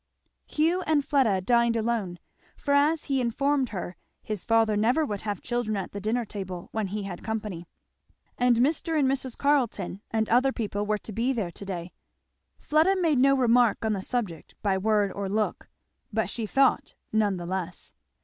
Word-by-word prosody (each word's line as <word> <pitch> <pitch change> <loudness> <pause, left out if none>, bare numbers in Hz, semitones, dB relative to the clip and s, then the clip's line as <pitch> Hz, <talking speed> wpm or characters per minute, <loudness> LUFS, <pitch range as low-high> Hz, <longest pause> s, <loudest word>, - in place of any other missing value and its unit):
Hugh 330 +4 +1
and 300 -3 +2
Fleda 235 -10 +2
dined 235 +3 +3
alone. 220 -6 -1 0.4
For 285 - -1
as 295 +3 +3
he 270 -2 0
informed 270 +2 +1
her 180 -3 -6 0.3
his 210 -4 -4
father 225 -2 +3
never 245 +9 +2
would 205 -7 -4
have 205 -3 -4
children 240 -3 -1
at 190 - -4
the 200 - -6
dinner 230 +3 0
table 185 -4 -7
when 220 -2 -1
he 205 +2 -4
had 190 -3 -7
company; 210 -6 -4 0.7
and 245 -1 +3
Mr. 315 +5 +1
and 280 -3 +3
Mrs. 260 -2 -2
Carleton 240 -10 0
and 220 -1 0
other 255 +4 +3
people 205 -4 -3
were 215 0 +1
to 215 - -10
be 240 +6 0
there 205 -8 -2
to 200 - -9
day, 180 -2 -5 0.6
Fleda 315 +6 +3
made 320 -7 +2
no 275 +1 +5
remark 240 -3 +3
on 220 - +1
the 195 - -2
subject, 190 -8 -3
by 200 -2 +2
word 205 0 +2
or 200 -1 -4
look, 215 +1 -2 0.4
but 220 0 -1
she 225 -3 -3
thought 270 +4 +2 0.2
none 210 -3 +2
the 175 - -6
less. 180 -1 -5
220 Hz, 180 wpm, -27 LUFS, 200-260 Hz, 0.7 s, no